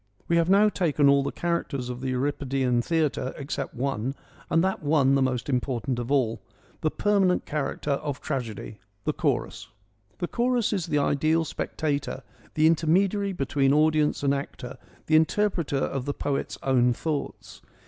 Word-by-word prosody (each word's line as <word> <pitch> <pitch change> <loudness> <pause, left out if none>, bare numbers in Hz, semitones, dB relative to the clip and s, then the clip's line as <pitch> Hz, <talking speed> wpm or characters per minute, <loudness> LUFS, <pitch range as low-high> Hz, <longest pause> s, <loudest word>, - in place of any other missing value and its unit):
We 170 - +2
have 170 +1 +2
now 200 +2 +6
taken 155 -8 +2
all 140 0 +5
the 135 - -2
characters 170 -7 -2
of 125 0 -6
the 130 - -2
Euripidean 130 -2 0
theatre, 150 -3 -1
except 140 -2 -4
one, 130 0 -2 0.3
and 165 +1 +3
that 190 0 0
one 145 -3 +3
the 135 - +3
most 130 -2 0
important 125 -2 -1
of 120 +2 -4
all 125 -5 +1 0.2
— - - -31
the 155 - +2
permanent 195 0 +2
character 145 -1 -2
of 140 0 -2
tragedy, 115 -6 -5 0.2
the - - 0
chorus. - - -2 0.5
The 175 - -2
chorus 240 -1 +1
is 190 -5 -2
the 150 - 0
ideal 155 +3 +2
spectator, 145 -3 -3 0.3
the 155 - +3
intermediary 185 +5 +2
between 140 -4 +1
audience 155 -1 +2
and 140 0 +3
actor, 140 -2 -6 0.3
the 155 - +2
interpreter 165 -2 +2
of 135 -1 -2
the 145 - -2
poet's 140 -1 -2
own 125 -2 +3
thoughts. 150 +3 -5
145 Hz, 160 wpm, -26 LUFS, 135-165 Hz, 0.5 s, now